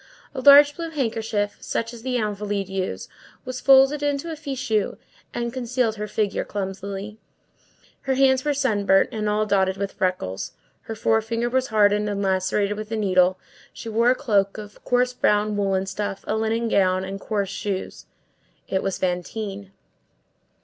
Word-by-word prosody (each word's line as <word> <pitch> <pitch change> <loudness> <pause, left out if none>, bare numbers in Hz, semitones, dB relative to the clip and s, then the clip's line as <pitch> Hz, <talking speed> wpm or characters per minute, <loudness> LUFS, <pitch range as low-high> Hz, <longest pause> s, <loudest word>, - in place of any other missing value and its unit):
A 265 - -4
large 285 +1 +8
blue 335 -1 -5
handkerchief, 225 -7 -2
such 230 +1 -3
as 235 - -10
the 250 +1 -1
Invalides 205 -3 -2
use, 190 -1 -3 0.4
was 255 0 -5
folded 270 +2 +5
into 290 +3 -1
a - - -4
fichu, 260 -8 -2 0.3
and 235 0 -3
concealed 250 -3 -1
her 210 0 -4
figure 210 -1 -1
clumsily. 200 +1 -5 0.9
Her 265 - +2
hands 265 -1 +3
were 295 -1 0
sunburnt 205 -8 +2
and 215 -3 -2
all 210 +1 +1
dotted 190 -2 +1
with 200 0 -3
freckles, 180 - -2 0.3
her 225 - -5
forefinger 225 +2 0
was 260 0 +1
hardened 210 -2 +3
and 200 0 -2
lacerated 195 +2 0
with 215 0 -6
the 225 - -2
needle; 185 -3 +3 0.4
she 230 - -8
wore 230 +2 +3
a 255 - +4
cloak 205 -8 +1
of 210 -1 -10
coarse 250 0 +1
brown 210 -3 +1
woollen 195 -2 0
stuff, 200 0 -4
a - - -1
linen 225 +1 0
gown, 185 -3 +2
and 195 +1 -6
coarse 200 -2 -2
shoes. 195 -1 -5 0.6
It 190 - 0
was 195 - -2
Fantine. 195 +2 -3
215 Hz, 160 wpm, -23 LUFS, 195-245 Hz, 0.9 s, large